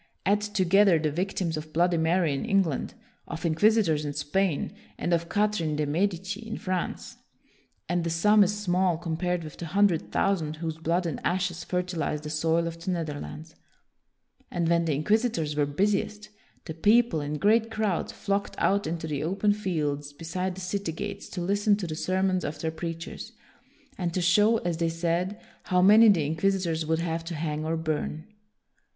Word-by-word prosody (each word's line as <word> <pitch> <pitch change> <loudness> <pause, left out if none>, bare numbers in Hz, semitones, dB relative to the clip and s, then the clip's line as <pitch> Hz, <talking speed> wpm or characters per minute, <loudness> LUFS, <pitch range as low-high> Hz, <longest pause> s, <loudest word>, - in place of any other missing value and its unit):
Add 205 +2 +3
together 195 -2 +4
the 155 -1 0
victims 175 0 -2
of 155 0 -7
Bloody 175 +1 +2
Mary 165 -1 +2
in 135 - -3
England, 195 - 0 0.3
of 160 - -5
inquisitors 170 -2 +3
in 145 -1 -3
Spain, 150 +3 -1 0.2
and 175 - -1
of 170 0 0
Catherine 205 -7 0
de' 150 0 0
Medici 190 +5 -1
in 225 -1 -6
France, 185 -4 -4 0.7
and 175 0 0
the 170 - -1
sum 205 +6 +5
is 205 +2 0
small 185 -3 +1
compared 170 +1 -2
with 155 - -9
the 170 - -6
hundred 195 -1 +2
thousand 160 -6 0
whose 160 0 -4
blood 170 +3 0
and 160 -5 -3
ashes 180 -1 -1
fertilized 180 -4 -2
the 150 - -5
soil 165 +2 +1
of 165 0 -6
the - - -3
Neth 170 -4 -1
erlands. 160 +2 -8 1.0
And 170 -2 -1
when 170 0 +2
the 155 -3 +1
inquisitors 165 - +1
were 145 -1 +1
busiest, 205 +6 -1 0.4
the 160 - -5
people, 210 +1 +3
in 145 +1 -3
great 220 +6 +3
crowds, 215 -6 -1
flocked 200 0 -2
out 200 -2 +1
into 160 0 -3
the 150 -3 -3
open 200 +5 +1
fields 150 -8 -2
beside 180 +4 -3
the 190 - -8
city 180 -2 -3
gates 200 +4 -6
to 180 - -5
listen 205 +3 +2
to 200 - -4
the 160 - -4
sermons 185 +2 0
of 150 - -4
their 160 - -2
preachers, 165 +1 -6 0.7
and 175 -2 -1
to 185 - +1
show, 210 +6 +4
as 170 -2 -2
they 165 0 +1
said, 170 +5 -1 0.3
how 180 - +2
many 215 +4 +8
the 170 -7 +3
inquisitors 165 0 0
would 160 0 +2
have 165 -1 -2
to 170 0 -5
hang 155 -1 -2
or 160 +1 -1
burn. 155 0 -3
170 Hz, 180 wpm, -27 LUFS, 160-195 Hz, 1.0 s, many